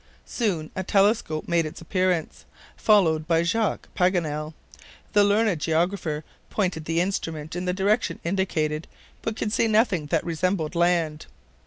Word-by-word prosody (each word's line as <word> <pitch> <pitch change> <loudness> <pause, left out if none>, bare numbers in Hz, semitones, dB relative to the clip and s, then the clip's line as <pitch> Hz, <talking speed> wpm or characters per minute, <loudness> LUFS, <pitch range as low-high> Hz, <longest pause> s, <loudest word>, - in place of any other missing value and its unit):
Soon 180 -10 -2
a 190 - -1
telescope 195 -5 +1
made 170 -1 +2
its 155 - -9
appearance, 180 -1 -1 0.3
followed 160 -8 +3
by 165 0 +3
Jacques 220 +5 0
Paganel. 160 -5 0 0.6
The 205 - +6
learned 205 -4 +2
geographer 160 -1 0 0.3
pointed 180 -6 -1
the 165 +1 0
instrument 165 -4 -2
in 180 +1 -3
the 180 - +1
direction 200 +5 +1
indicated, 160 -4 -1 0.3
but 225 - -3
could 215 -1 -2
see 230 - +2
nothing 215 -8 +2
that 160 0 +1
resembled 170 -1 -1
land. 170 -3 +1
175 Hz, 140 wpm, -25 LUFS, 160-200 Hz, 0.6 s, The